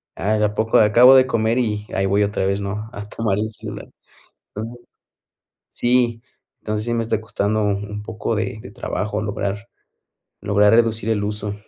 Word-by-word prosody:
ah, 105 +2 -1
de 105 - +3
a 105 - -1
poco 110 +1 +2
acabo 120 +5 +7
de 130 - +6
comer 115 +1 +1
y 105 -3 -2
ahí 95 - +1
voy 100 +2 +2
otra 100 -2 -1
vez, 100 +1 0
¿no? 105 +2 -4
A 105 0 -8
tomar 105 -3 -1
el 110 +1 -1
celular. 110 - -8 0.7
Entonces 115 +3 -7 0.9
sí 120 -2 +1 0.4
Entonces 105 +1 -3
sí 120 - -1
me 115 - 0
está 110 -1 -1
costando 110 0 -1
un 105 +1 -2
poco 110 +1 -3
de 110 0 -3
de 125 - -10
trabajo 105 -2 -3
lograr 100 +1 -4 0.7
lograr 105 0 +3
reducir 115 -1 +2
el 105 -2 0
uso. 105 0 -3
105 Hz, 175 wpm, -21 LUFS, 105-115 Hz, 0.9 s, acabo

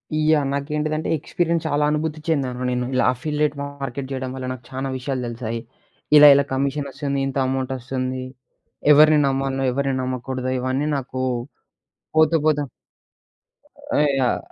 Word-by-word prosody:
Yeah! 155 -2 +3
నాకేంటిదంటే, 150 +2 -2
experience 170 +1 -1
చాలా 145 +1 +1
అనుభూతి 155 0 -2
చెందాను 130 -5 -1
నేను. 125 0 -1
ఇలా 130 - +2
అఫిల్లేట్ 150 +2 -1
మార్కెట్ 140 -2 -5
జేయడం 130 -1 -3
వల్ల, 130 -1 -5
నాకు 130 -2 -7
చానా 135 +1 -4
విషయాలు 130 0 -3
దెలిసాయి. 115 -1 -4 0.6
ఇలా, 150 0 +10
ఇలా 140 - +4
కమిషనొస్తుంది, 140 +1 -2
ఇంత 135 - -4
అమౌంటొస్తుంది, 130 0 -3 0.7
ఎవరిని 155 +1 +7
నమ్మాల్నో, 135 0 -1
ఎవరిని 135 +1 -1
నమ్మకూడదో, 130 0 -3
ఇవన్నీ 130 +4 -1
నాకూ 130 -1 -3 0.9
పోతూ, 160 +1 +5
పోతూ 150 -1 +2 1.4
ఆ! - - +4 0.2
యాహ్! 125 -2 +1
135 Hz, 130 wpm, -22 LUFS, 130-150 Hz, 1.4 s, ఇలా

